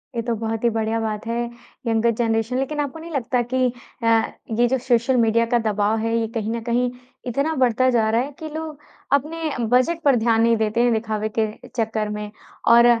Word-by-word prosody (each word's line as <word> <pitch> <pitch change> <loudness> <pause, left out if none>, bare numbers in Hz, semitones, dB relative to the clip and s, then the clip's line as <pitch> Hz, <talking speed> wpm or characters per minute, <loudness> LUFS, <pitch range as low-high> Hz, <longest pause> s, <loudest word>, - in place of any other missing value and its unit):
ये 230 - 0
तो 235 +1 -1
बहुत 225 0 -3
ही 235 - +4
बढ़िया 225 0 -1
बात 215 -1 -3
है। 230 0 -1 0.5
यंगर 230 +1 +2
जनरेशन 225 +1 0
लेकिन 270 +3 -2
आपको 290 +2 -3
नहीं 335 +1 -9
लगता 255 -3 0
कि 255 -1 +3 0.3
अ, - - +1 0.5
ये 240 - +5
जो 265 +2 +1
सोशल 250 0 +1
मीडिया 230 0 +3
का 240 +1 +2
दबाव 215 -1 +1
है, 230 +1 0
ये 225 -1 0
कहीं 220 -1 -1
न 230 0 -3
कहीं 245 +1 +1 0.4
इतना 280 +6 0
बढ़ता 255 -1 +3
जा 225 -3 +2
रहा 225 +2 +2
है 275 +3 -4
कि 315 - -6
लोग 310 -1 -6 0.3
अपने 315 +3 0 0.2
बजट 255 +8 +2
पर 280 -3 +5
ध्यान 225 -1 +2
नहीं 230 0 +4
देते 220 +1 +1
हैं 245 - +3
दिखावे 220 -1 -2
के 220 - +3 0.2
चक्कर 220 -2 -2
में। 210 0 -5 0.4
और 235 0 +7
235 Hz, 210 wpm, -22 LUFS, 225-255 Hz, 0.5 s, और